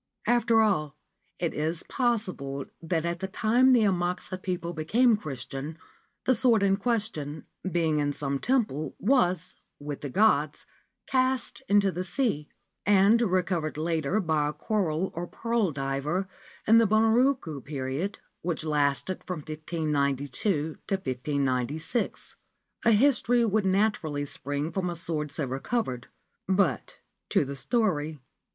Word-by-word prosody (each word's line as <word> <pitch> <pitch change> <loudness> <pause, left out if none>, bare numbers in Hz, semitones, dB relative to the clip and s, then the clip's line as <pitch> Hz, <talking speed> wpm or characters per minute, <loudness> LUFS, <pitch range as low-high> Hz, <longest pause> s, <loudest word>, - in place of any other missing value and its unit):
After 235 -2 +4
all, 155 -9 +1 0.4
it 170 -2 -1
is 160 +2 -2
possible 185 - -1 0.2
that 165 -1 -1
at 170 0 -2
the 190 - -3
time 240 +7 +3
the 245 -3 +6
Amakusa 180 -1 -1
people 175 -2 -3
became 220 +10 +3
Christian 150 -3 -6 0.5
the 260 - +4
sword 230 -3 +3
in 195 0 +3
question, 195 -10 -2 0.3
being 160 -3 +1
in 145 0 +1
some 140 -1 -2
temple, 210 - 0
was 185 - +2 0.3
with 145 -1 -6
the 145 - -4
gods 155 -4 +2 0.4
cast 260 -1 0
into 200 -1 +4
the 180 0 -3
sea, 185 - -1 0.3
and 205 +3 +5
recovered 180 -7 0
later 160 +3 0
by 160 -6 +1
a 150 - -2
coral 180 0 -1
or 175 +1 -4
pearl 230 -4 0
diver 140 +7 -2 0.4
in 225 +1 +7
the 230 - +4
Bunroku 220 - +2
period, 140 +6 -3 0.2
which 165 -2 -2
lasted 150 +3 0
from 180 -4 -3
1592 150 - -1
to 195 - +1
1596. 140 - -2 0.5
A 230 - +6
history 240 0 +4
would 215 -2 +1
naturally 185 -7 +1
spring 145 +2 -4
from 185 -1 -1
a 175 - -4
sword 155 -3 -2
so 145 0 -1
recovered. 130 - -2 0.4
But 190 -7 +1 0.3
to - - +2
the 140 +1 -5
story. 160 - 0
175 Hz, 130 wpm, -27 LUFS, 150-215 Hz, 0.5 s, in